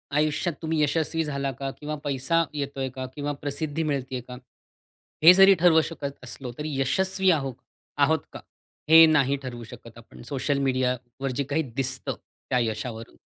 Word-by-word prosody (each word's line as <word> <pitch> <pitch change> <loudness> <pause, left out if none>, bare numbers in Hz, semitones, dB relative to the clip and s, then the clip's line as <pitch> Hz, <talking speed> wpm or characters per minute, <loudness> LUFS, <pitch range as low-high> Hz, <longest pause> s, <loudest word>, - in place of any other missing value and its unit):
आयुष्यात 155 +3 +1
तुम्ही 160 -1 -1
यशस्वी 160 +2 0
झाला 140 -2 -2
का, 135 +1 -5
किंवा 150 +1 -4
पैसा 145 +4 +1
येतो 140 -2 -4
आहे 135 -1 -1
का, 130 -1 -4
किंवा 145 0 -3
प्रसिद्धी 145 +2 -3
मिळते 135 -4 -2
आहे 125 - -3
का, 125 0 -8 0.9
हे 170 +3 +11
जरी 195 +1 +7
ठरवू 165 -2 +5
शकत 140 -4 -6
असलो, 125 0 -7
तरी 150 -1 -3
यशस्वी 190 +7 +2
आहो 135 -5 -1 0.4
आहोत - - +3
का, - - -7 0.5
हे 165 +1 +10
नाही 140 -4 +3
ठरवू 120 -2 -7
शकत 115 0 -13
आपण, 115 - -14
सोशल 140 +1 0
मीडियावर 130 0 -1
जे 140 - 0
काही 155 +3 +1
दिसतं 130 -1 -2 0.3
त्या 125 - +2
यशावरून. 115 0 -4
140 Hz, 165 wpm, -25 LUFS, 130-155 Hz, 0.9 s, हे